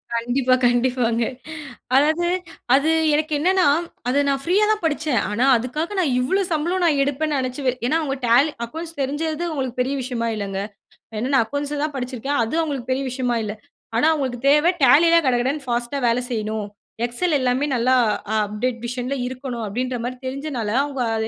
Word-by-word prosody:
கண்டிப்பா, 245 +2 +1
கண்டிப்பாங்க. 245 -1 +2 0.7
அதாவது, 315 +5 +3 0.5
அது 290 +4 +3 0.2
எனக்கு 305 +1 0
என்னென்னா, 370 +4 +3 0.4
அத 285 +3 +3
நான் 275 -1 0
ஃப்ரீயா 380 +6 +3
தான் 425 -5 -1
படிச்சேன். 300 -5 0
ஆனா 235 +5 +1
அதுக்காக 300 - -3
நான் 300 -8 +1
இவ்வளோ 325 +11 +1
சம்பளம் 345 +4 0
நான் 295 -4 +3
எடுப்பேன்னு 290 +1 -1
நெனச்சு 255 +2 -3
வே 255 - +4 0.2
ஏன்னா, 315 - +2
அவங்க 275 -3 -2
டேலி 255 +7 +4
அக்கவுண்ட்ஸ் 325 +5 -7
தெரிஞ்சது, 305 +4 -2
அவுங்களுக்கு 260 -5 -4
பெரிய 270 +3 -1
விஷயமா 240 -2 -2
இல்லைங்க. 195 -2 -3 0.6
ஏன்னா 250 +4 -2
நான் 245 - +5
அக்கவுண்ட்ஸ 285 +3 -3
தான் 300 -2 -3
படிச்சிருக்கேன். 255 +2 -2
அது 225 +7 -3
அவுங்களுக்கு 275 -6 -4
பெரிய 265 +1 0
விஷயமா 250 -2 -1
இல்ல. 210 -1 -3 0.4
ஆனா 275 - +4
அவுங்களுக்கு 260 -6 -2
தேவை, 300 +4 +5
Tallyல 330 +7 +6
கடகடன்னு 260 +3 0
ஃபாஸ்ட்டா 240 +3 -1
வேலை 235 +2 +2
செய்யணும். 215 -2 -2 0.4
எக்ஸெல் 295 +7 0
எல்லாமே 255 +2 +1
நல்லா 250 +2 +3 0.4
அப்டேட் 215 +4 -1
வெர்ஷன்ல 250 +2 -3
இருக்கணும். 255 -2 -5
அப்படீன்ற 250 +4 -2
மாரி 250 +1 -3
தெரிஞ்சனால, 265 -4 -3 0.2
அவுங்க 275 -3 -4 0.2
அத 220 0 -1
260 Hz, 165 wpm, -22 LUFS, 245-300 Hz, 0.7 s, Tallyல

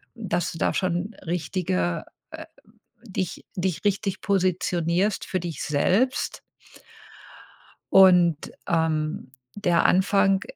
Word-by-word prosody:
dass 180 -7 -2
du - - -8
da - - +1
schon 185 +3 -1
richtige, 160 - -1 0.3
äh - - -8 0.6
dich 190 -2 -4
dich 185 0 -2
richtig 195 -1 0
positionierst, 185 0 0
für 185 - -2
dich 165 -5 -5
selbst. 195 - 0 1.5
Und, 180 -5 +5 0.2
ähm, 155 -4 -1 0.2
der 175 -5 +2
Anfang 195 +1 +3
180 Hz, 95 wpm, -24 LUFS, 165-195 Hz, 1.5 s, Und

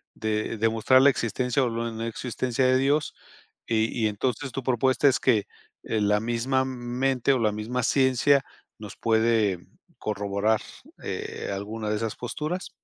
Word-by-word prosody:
de 110 +1 -2
demostrar 115 +4 +4
la 140 - +7
existencia 125 +2 0
o 125 - +1
no 115 -1 -3
existencia 125 +2 -2
de 130 0 +4
Dios 145 +3 +1 0.5
y 110 -1 +2 0.2
y - - +4
entonces 125 +5 -2
tu 135 - -4
propuesta 130 +2 +3
es 130 - +1
que, 115 -6 +2 0.4
eh, 110 - -1
¿la 105 +1 +2
misma 120 +3 0
mente, 130 +1 0
o 130 - +1
la 110 -2 +2
misma 115 +4 -3
ciencia 135 +2 +3 0.3
nos 105 -3 -9
puede 110 -4 +2 0.4
corroborar, 105 +1 0 0.4
eh, - - -5
alguna 105 +2 -4
de 105 - 0
esas 110 -1 -3
posturas? 155 +9 -4
115 Hz, 150 wpm, -26 LUFS, 110-130 Hz, 0.5 s, la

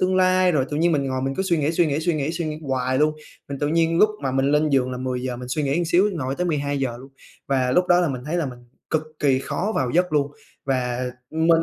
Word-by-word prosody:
tương 185 0 +2
lai, 185 0 +4
rồi 140 -5 +2
tự 145 - -2
nhiên 170 +2 +2
mình 145 -3 +1
ngồi 130 -1 -2
mình 135 +1 -1
cứ 190 - -1
suy 185 -3 +1
nghĩ, 150 +1 +1
suy 170 0 +3
nghĩ, 150 0 -1
suy 170 +1 0
nghĩ, 150 0 -1
suy 170 0 -3
nghĩ 155 0 -4
hoài 130 -2 -1
luôn. 150 +1 +3 0.3
Mình 140 - -5
tự 145 - 0
nhiên 165 +1 +2
lúc 215 - +5
mà 135 -2 -1
mình 135 +1 +1
lên 150 +1 +3
giường 130 -2 +2
là 125 - -4
10:00 125 -1 -3
mình 125 0 -8
suy 150 +4 -1
nghĩ 140 +3 0
một 175 - +1
xíu 185 +5 +3
ngồi 135 -6 -3
tới 180 - -2
12:00 140 -5 -1
luôn. 135 +3 -13 0.3
Và 130 -2 +1
lúc 180 +6 +3
đó 175 0 +5
là 175 - +1
mình 130 -3 -4
thấy 155 +4 -2
là 170 -4 0
mình 125 -2 -8 0.3
cực 155 - +1 0.2
kỳ 135 -3 +3
khó 200 +9 -2
vào 130 -3 0
giấc 180 +3 +1
luôn 145 -1 +1 0.3
và 125 -2 -1 0.2
mình 165 +1 +3
145 Hz, 280 wpm, -23 LUFS, 130-170 Hz, 0.3 s, lúc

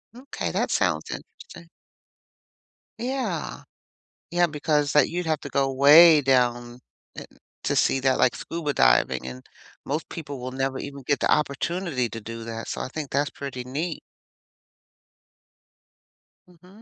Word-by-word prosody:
Okay, 260 +3 -5
that - - -1
sounds - - 0
interesting. 165 - -10 1.3
Yeah. 240 - -3 0.7
Yeah, 175 0 +3
because 150 -1 0
that 150 -3 +4
you'd 175 +1 -3
have 155 -1 0
to 145 - -7
go 135 0 +1
way 150 +4 +8
down 120 -2 +1 0.4
in - - -8 0.4
to - - 0
see 135 - +2
that, 130 -1 +2
like 125 - +3
scuba 160 -4 -4
diving, - - +3
and 65 0 -8 0.4
most 150 +3 -3
people 145 -5 -7
will 130 +1 -5
never 135 0 -2
even 140 0 -7
get 145 +2 0
the - - +2
opportunity 150 -2 0
to 115 - -7
do 115 +1 -7
that, 115 0 -6
so, - - -4
I - - -3
think 150 -1 -6
that's 140 +1 0
pretty 135 -3 -6
neat. 150 +6 -4 2.5
Mhm. 180 +4 -19
140 Hz, 145 wpm, -25 LUFS, 125-165 Hz, 2.5 s, way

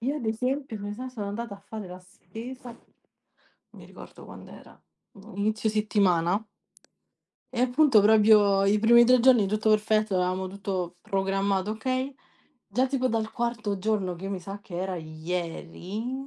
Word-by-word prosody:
Io 270 +5 -1
ad 280 - -6
esempio, 250 +1 -2
come 205 +1 -5
sai, 255 +3 -7
sono 215 -5 -6
andata 220 +1 -5
a - - -14
fare 210 0 -8
la 180 0 -9
spesa, 225 +8 -10
non 235 - -22
mi - - -12
ricordo - - -13
quand'era, - - -13 0.3
boh, 205 +3 -15
a - - -12
inizio 215 +2 0
settimana... 200 -3 +1 1.1
e 240 - -1
appunto 255 -1 +4
proprio 210 -2 +5
i 200 +2 +3
primi 235 +2 +6
3 250 +1 +5
giorni 240 -4 +5
tutto 215 +2 0
perfetto, 215 -1 +2
avevamo 185 +1 0
tutto 185 -2 -4
programmato 195 0 -1
okay, 255 +4 -2 0.5
già 250 +6 +1
tipo 260 -1 0
dal 220 -1 -1
quarto 235 -4 -2
giorno 195 -2 -1
che 190 - -10
io 195 - -4
mi 190 - -4
sa 195 +3 -7
che 175 - -9
era 190 -1 -3
ieri, 175 +9 -5
210 Hz, 160 wpm, -26 LUFS, 195-235 Hz, 1.1 s, primi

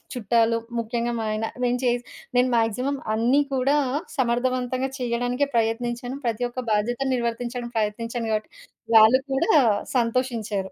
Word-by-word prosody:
చుట్టాలు. 230 0 +2 0.2
ముఖ్యంగా 235 +1 -2
మా - - -2
ఆయన. 215 +1 -1 0.2
నేను 245 0 +1
చే 245 - +4 0.5
నేను 250 +1 +4
మాక్సిమం 250 +5 0 0.2
అన్ని 245 +6 +3
కూడా 265 +3 +2 0.4
సమర్ధవంతంగా 255 +1 0
చేయడానికే 245 +2 0
ప్రయత్నించాను. 240 +3 -1
ప్రతి 230 +1 -1
ఒక్క 255 +1 -5
బాధ్యతలు 240 +6 0
నిర్వర్తించడానికి 240 0 -3
ప్రయత్నించాను 230 +2 -2
కాబట్టి. 215 0 -2 0.4
వాళ్ళు 220 +4 +8
కూడా 270 +5 +2 0.4
సంతోషించారు. 230 -5 -1
240 Hz, 125 wpm, -24 LUFS, 225-255 Hz, 0.5 s, వాళ్ళు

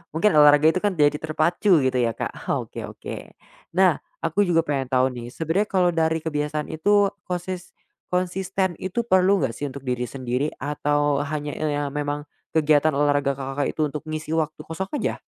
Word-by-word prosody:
mungkin 210 +6 +3
olahraga 150 +1 +7
itu 185 - -1
kan 205 -1 0
jadi 150 -1 +3
terpacu 160 +2 +2
gitu 130 -1 +1
ya, 115 -2 +1
Kak, - - -6
oke - - -2
oke. - - -9 0.4
Nah, 185 -1 +4 0.2
aku 205 -1 +1
juga 165 -2 +3
pengen 135 -3 -2
tahu 130 0 +2
nih, 120 -1 -7
sebenarnya 165 +6 0
kalau 185 -2 +3
dari 160 -1 0
kebiasaan 150 -1 -2
itu, 200 +5 +3 0.2
kosis 180 0 -5 0.3
konsisten 185 +1 -1
itu 190 +6 -2
perlu 190 -2 +4
enggak - - 0
sih 145 +5 -4
untuk 140 0 -9
diri 125 -1 -2
sendiri, 130 +2 -2
atau 145 0 0
hanya, 150 0 -3
eee, 145 -1 -2
memang 145 0 -3 0.3
kegiatan 155 -1 +3
olahraga 145 -1 +2
Kakak 135 +1 -2
itu 155 - +1
untuk 150 - -5
mengisi 155 0 -4
waktu 155 -1 -1
kosong 190 +4 -5
aja? - - -2
155 Hz, 170 wpm, -24 LUFS, 145-180 Hz, 0.4 s, olahraga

